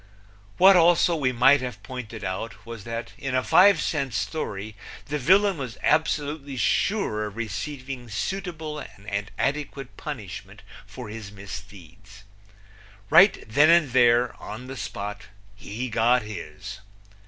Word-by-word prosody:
What, 195 +1 +8
also, 170 0 +5
we 135 -5 +1
might 130 +3 +5
have 125 -6 -6
pointed 115 -5 -7
out 95 +6 -5
was 115 -4 -9
that 115 0 -5
in 135 -2 -3
a 130 - +2
five 195 -1 +6
cent 140 -7 -2
story 105 -7 -4 0.3
the 150 0 -3
villain 190 +5 +4
was 125 -4 -6
absolutely 145 -3 0
sure 115 - 0
of 105 - -10
receiving 125 +3 -5
suitable 160 - -4
and 100 -3 -6
adequate 140 -2 -3
punishment 100 - -8 0.2
for 105 +2 -9
his 105 -1 -8
misdeeds. 95 -1 -11 0.9
Right - - +6
then 145 +8 +4
and 165 -6 +5
there, 120 0 +4
on 110 +4 -7
the 135 +1 -7
spot, 100 -5 -6 0.3
he 110 +5 -5
got 120 +1 +2
his. 105 -1 -8
125 Hz, 130 wpm, -25 LUFS, 105-145 Hz, 0.9 s, What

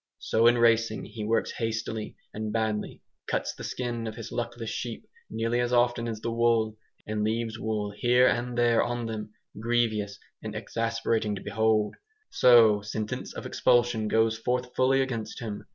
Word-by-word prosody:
So 115 +1 +2
in 120 0 +5
"racing" 115 -2 +3
he 110 0 -7
works 110 +2 +1
hastily 115 -1 -3 0.2
and 110 0 -4
badly, 110 -1 -2 0.2
cuts - - -1
the - - -10
skin 120 -2 -3
of 110 - -5
his 115 -1 -8
luckless 115 -1 -4
sheep 120 -2 -5 0.2
nearly 115 +2 -1
as 120 0 0
often 120 -1 +2
as 110 -2 -4
the 115 - -2
wool, 115 -2 +2 0.3
and 105 0 -2
leaves 115 +1 -1
wool 105 -2 -2
here 125 +3 +4
and 120 0 0
there 120 -1 +4
on 120 0 -2
them, 110 -1 -5 0.3
grievous 110 -3 0 0.2
and - - -6
exasperating 115 -2 -1
to - - -7
behold. 110 -1 +1 0.3
So 115 -4 +6
sentence 105 +1 -4
of - - -6
expulsion 120 -3 +2
goes 110 +1 +2
forth 125 +1 -2
fully 135 +1 +3
against 115 -5 -5
him. 110 -4 -6
115 Hz, 165 wpm, -27 LUFS, 110-120 Hz, 0.3 s, So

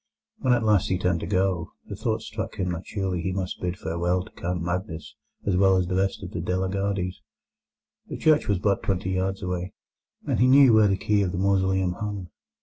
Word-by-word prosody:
When 130 - +1
at 120 -2 +1
last 105 -4 +3
he 90 - +1
turned 90 -2 0
to - - -5
go, 90 -2 0
the - - -7
thought - - -2
struck - - -5
him 90 -1 -1
that 85 0 -5
surely 95 -4 -2
he 95 - -2
must 95 -1 -4
bid 90 0 -2
farewell 85 +2 -1
to - - -15
Count 90 +1 -3
Magnus 85 -4 -4 0.3
as 100 - +1
well 95 0 +4
as 90 - +1
the 90 +1 -2
rest 95 +1 0
of 90 - -7
the 85 - -4
De 90 +1 -1
la 95 0 -1
Gardies. 95 -2 -2 0.9
The - - -5
church 155 -1 +3
was 100 - +2
but 100 +1 +1
twenty 95 -1 -1
yards 95 +1 -1
away, 90 0 -3 0.5
and - - 0
he 125 - +5
knew 135 -2 +7
where 110 -1 +6
the 95 -1 +1
key 105 +1 +1
of 95 -3 0
the 90 - -4
mausoleum 95 -1 +2
hung. 100 -3 -5
95 Hz, 225 wpm, -25 LUFS, 90-100 Hz, 0.9 s, knew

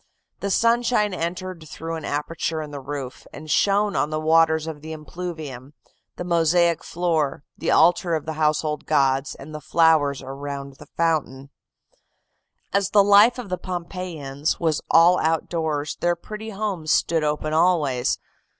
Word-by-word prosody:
The 200 - -3
sunshine 230 -1 +2
entered 175 -1 -4
through 165 +4 -6
an 160 -2 -5
aperture 160 +2 -2
in 150 -1 -6
the 145 - -6
roof, 135 -2 -7
and 155 -1 -8
shone 205 +1 +2
on 150 - +1
the 155 0 -2
waters 160 0 +3
of 160 -2 -7
the 160 +1 -7
impluvium, 155 -4 -7 0.4
the - - -5
mosaic 170 -1 +2
floor, 160 -5 -1
the - - -3
altar 175 +1 +4
of 155 - -4
the 160 - -3
household 155 0 0
gods 135 0 +1
and 150 +3 -11
the 150 - -6
flowers 150 -4 +3
around 140 0 -7
the - - -14
fountain. 145 -5 -1 1.2
"As 200 -1 +2
the 200 0 +5
life 205 +5 +6
of 240 -5 -7
the 180 -1 -3
Pompeiians 170 -6 -4
was 160 -3 0
all 175 +2 +6
outdoors, 160 -2 -1
their 175 0 +1
pretty 215 +5 -8
homes 195 -7 -3
stood 165 -2 +2
open 150 +1 -1
always. 155 -7 +2
160 Hz, 150 wpm, -23 LUFS, 150-180 Hz, 1.2 s, life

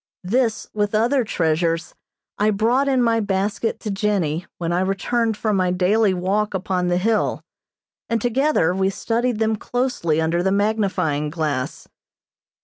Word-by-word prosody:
This, 225 +4 0
with 210 0 0
other 240 +5 +2
treasures, 165 -4 0 0.5
I 210 +1 +3
brought 230 +7 +2
in 260 -2 +2
my 230 -1 +2
basket 205 +2 -1
to 210 - -3
Jennie 190 -5 -1
when 170 0 -2
I 175 - +1
returned 220 +4 0
from 215 -2 0
my 185 -1 +2
daily 195 +4 +2
walk 195 +3 -1
upon 185 -1 -1
the 175 0 +1
hill, 215 +4 0 0.7
and 230 -1 +1
together 245 - +2
we 190 +1 +1
studied 235 +4 -1
them 220 0 +1
closely 245 -11 -1
under 165 +2 +1
the 190 +1 +1
magnifying 195 -8 0
glass. 150 -5 -3
200 Hz, 145 wpm, -21 LUFS, 180-225 Hz, 0.7 s, I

